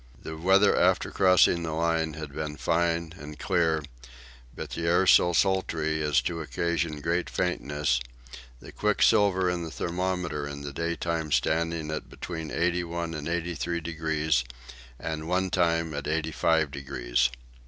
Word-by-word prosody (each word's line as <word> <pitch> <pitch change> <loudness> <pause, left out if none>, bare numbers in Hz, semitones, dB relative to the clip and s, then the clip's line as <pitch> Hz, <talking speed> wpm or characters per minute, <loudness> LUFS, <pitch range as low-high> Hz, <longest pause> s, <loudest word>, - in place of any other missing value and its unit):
The 80 - -7
weather 95 +5 +4
after - - +2
crossing 90 -2 +4
the 80 -1 -3
Line 80 -1 0
had 80 -3 -7
been 75 0 -4
fine 85 -1 0
and 75 +1 -9
clear, 80 -5 +1 0.7
but - - -7
the 85 0 -3
air 90 +3 +4
so 90 -1 +6
sultry 80 -4 +1
as 75 -4 +2
to 85 +2 -2
occasion 85 -1 -2
great 85 +3 -1
faintness, 75 -7 0 0.6
the - - -11
quicksilver 100 -2 +3
in 90 -1 -1
the 80 - -5
thermometer 85 -3 -2
in 70 0 -7
the 70 -1 -6
daytime 85 -1 -2
standing 80 0 0
at 80 - -5
between 80 -3 -6
81 85 0 -1
and 75 -1 -5
83 85 -1 -2
degrees, 80 -4 0 0.5
and 80 +2 -5
one 95 +1 0
time 85 -3 +1
at 70 -1 -4
85 80 -1 +1
degrees. 65 -3 0
80 Hz, 145 wpm, -27 LUFS, 75-85 Hz, 0.7 s, so